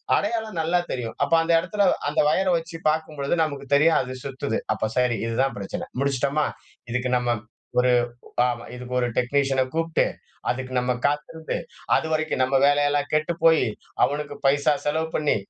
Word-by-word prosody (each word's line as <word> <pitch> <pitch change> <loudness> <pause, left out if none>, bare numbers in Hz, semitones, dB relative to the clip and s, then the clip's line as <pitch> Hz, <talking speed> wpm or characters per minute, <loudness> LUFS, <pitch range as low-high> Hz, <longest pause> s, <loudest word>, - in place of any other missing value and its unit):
அடையாளம் 220 -6 -1
நல்லா 175 +2 +2
தெரியும். 115 -3 -4
அப்ப - - 0
அந்த 165 +1 +1
இடத்தில, 200 +3 0 0.2
அந்த - - -1
வயர் 185 +2 +2
வெச்சு 165 0 -7
பார்க்கும்பொழுது 155 -1 -1
நமக்கு 140 -3 -4
தெரியும் 160 +3 +5
அது 130 0 -6
சுத்துது. 130 -5 -2 0.2
அப்ப 110 - -2
சரி 125 -2 +2
இதுதான் 130 +4 0
பிரச்சன. 95 - -5
முடிச்சுட்டோமா? 140 +2 +1 0.4
இதுக்கு 125 +1 -1
நம்ம 120 0 -1 0.5
ஒரு 125 0 +4 0.5
அ - - +3 0.3
இதுக்கு 125 0 -7
ஒரு 120 - +1
டெக்னீசியன 135 +1 +2
கூப்ட்டு 165 0 +1 0.5
அதுக்கு 130 0 -2
நம்ம 125 0 +1
காத்திருந்து, 150 +2 -2 0.4
அதுவரைக்கும் 155 -3 0
நம்ம 135 +1 +1
வேலையெல்லாம் 145 0 +2
கெட்டுப்போய், 160 +1 +3 0.4
அவனுக்கு 145 0 -1
பைசா 145 +2 +4
செலவு 160 +2 0
பண்ணி 150 -1 +2
145 Hz, 145 wpm, -24 LUFS, 130-160 Hz, 0.5 s, தெரியும்